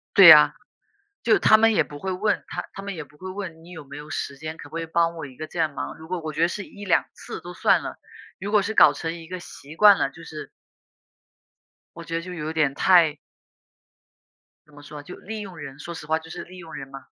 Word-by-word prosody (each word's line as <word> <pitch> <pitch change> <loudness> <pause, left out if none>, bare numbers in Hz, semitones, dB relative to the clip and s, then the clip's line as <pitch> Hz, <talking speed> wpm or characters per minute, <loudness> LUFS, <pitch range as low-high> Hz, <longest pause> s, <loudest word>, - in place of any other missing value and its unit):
对 195 -3 +10
呀， 155 -2 +10 0.7
就 230 - +4
他 215 - +6
们 225 0 +4
也 - - +3
不 145 - -10
会 190 0 -3
问 195 +4 0
他 - - -4
他 195 - -7
们 200 -1 -5
也 160 - -6
不 150 0 -22
会 185 +4 -8
问 185 -5 -7
你 175 - -14
有 160 -4 -9
没 140 +1 -10
有 150 +1 -10
时 140 - -4
间， 155 +2 -7
可 145 - -11
不 160 - -11
可 165 - -2
以 - - -4
帮 165 +1 +1
我 165 - -6
一 130 -3 -13
个 155 - -6
这 - - -11
样 155 -3 +1
忙。 - - -5
如 160 - -12
果 185 -1 -2
我 155 -1 -5
觉 155 - -2
得 170 - +5
是 200 +2 -5
1-2 200 -4 0
次 - - -8
都 175 - -9
算 - - +3
了， - - -7 0.4
如 200 +2 -5
果 210 -1 +5
是 220 - -3
搞 155 - +7
成 165 +3 -4
一 165 -1 -11
个 185 +1 -6
习 150 -3 -12
惯 205 -2 +8
了， - - 0
就 170 - -14
是 155 -1 -8 1.5
我 170 - -8
觉 165 - -5
得 165 - -1
就 180 +1 -8
有 155 -2 -4
点 155 -4 +1
太 165 -1 +4 1.5
怎 150 - -23
么 145 - -13
说？ 145 0 -10
就 180 - -10
利 215 +2 -7
用 190 -4 -9
人， 135 -3 -9
说 165 +4 -7
实 155 -2 -9
话 160 +1 +2
就 160 0 -12
是 - - -7
利 185 +1 -13
用 170 -3 -11
人 135 - -7
嘛。 135 0 -11
165 Hz, 270 characters per minute, -24 LUFS, 150-185 Hz, 1.5 s, 对